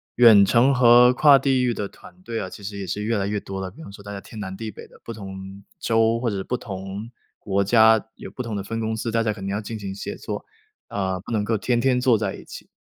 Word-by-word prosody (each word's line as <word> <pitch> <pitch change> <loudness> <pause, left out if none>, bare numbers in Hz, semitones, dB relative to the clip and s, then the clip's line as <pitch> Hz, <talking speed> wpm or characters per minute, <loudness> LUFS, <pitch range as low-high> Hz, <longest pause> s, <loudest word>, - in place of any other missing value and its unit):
远 110 -5 +8
程 125 +6 +4
和 125 0 +6
跨 140 +1 +6
地 135 -2 +1
域 125 -1 +1
的 100 -2 -4
团 180 - -17
队 115 -8 -4
啊， 95 - -4
其 100 - -11
实 100 +1 -6
也 95 - -5
是 105 +4 -3
越 110 +1 0
来 100 -1 -1
越 105 0 -1
多 95 0 -6
了。 95 -1 -4
比 115 - -15
方 - - -10
说 100 - -12
大 100 0 -8
家 100 - -6
天 110 - -11
南 95 -2 -5
地 110 +2 -6
北 - - -12
的， - - -19
不 115 - -7
同 95 -2 -9 0.2
州 115 +1 +1
或 120 - 0
者 100 - -3
是 95 - -3
不 125 - -1
同 100 +1 -7 0.3
国 100 -1 -1
家， 110 +1 +5
有 - - -10
不 - - -6
同 115 -3 -4
的 100 - -3
分 115 +3 -4
公 110 0 -2
司， 115 +1 -3
大 115 0 +1
家 110 -2 0
肯 95 -2 -8
定 100 - -2
要 105 - -1
进 110 +1 -6
行 100 -2 -6
协 100 - -6
作， - - -6 0.4
啊， 95 -2 -2
不 110 - -7
能 105 -1 +1
够 110 +1 0
天 120 +2 0
天 130 -2 +2
坐 125 -3 +3
在 100 -2 -2
一 - - -11
起。 - - -11
110 Hz, 305 characters per minute, -23 LUFS, 100-115 Hz, 0.4 s, 远